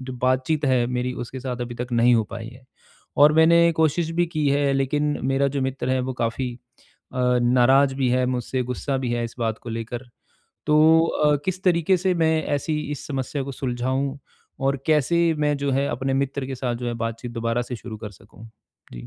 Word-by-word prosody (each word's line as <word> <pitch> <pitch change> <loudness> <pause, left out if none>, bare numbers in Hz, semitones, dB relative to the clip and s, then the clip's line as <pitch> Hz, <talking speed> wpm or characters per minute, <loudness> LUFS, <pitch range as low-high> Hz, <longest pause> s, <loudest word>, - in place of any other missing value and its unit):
जो 130 0 -7
बातचीत 130 +4 0
है 125 -2 +2
मेरी 125 +1 -2
उसके 130 +2 -8
साथ 125 -1 -5
अभी 120 0 -4
तक 125 +1 -5
नहीं 120 +1 +4
हो 110 - +2
पाई 115 +1 -6
है। 125 +1 -14 0.5
और 145 +1 +7
मैंने 170 +1 +5
कोशिश 160 +1 +1
भी 175 - +3
की 155 -4 -1
है 140 0 +2
लेकिन 145 +2 0
मेरा 135 +1 +2
जो - - 0
मित्र 130 -1 -3
है 130 - +2
वो 130 +1 -3
काफ़ी 120 +2 -1 0.6
अ, 125 -1 +2
नाराज 130 +3 +4
भी 135 -1 0
है 125 +1 +2
मुझसे, 125 +1 -2
गुस्सा 125 +3 -3
भी 125 -2 -2
है 120 0 -1
इस 115 - -7
बात 115 -2 -1
को - - -11
लेकर। 115 +1 -5 0.6
तो 150 0 +3 0.3
अ, 150 -2 +2
किस 185 0 -3
तरीक़े 175 0 +3
से 185 +1 0
मैं 160 -2 +2
ऐसी 150 +1 -2
इस 145 - -7
समस्या 135 0 -3
को 140 - -6
सुलझाऊँ 130 +2 -2 0.5
और 135 +1 +2
कैसे 165 +2 +3
मैं 150 -1 +1
जो 140 0 -1
है 135 +2 +1
अपने 135 0 -2
मित्र 135 0 -1
के 135 - -4
साथ 125 -1 -2
जो 120 +1 -5
है 120 - -3
बातचीत 115 +1 -6
दोबारा 115 +1 -1
से 125 0 -6
शुरू 115 -1 -8
कर 105 -1 -7
सकूँ? 105 +3 -15 0.4
जी। - - -9
130 Hz, 210 wpm, -23 LUFS, 120-145 Hz, 0.6 s, और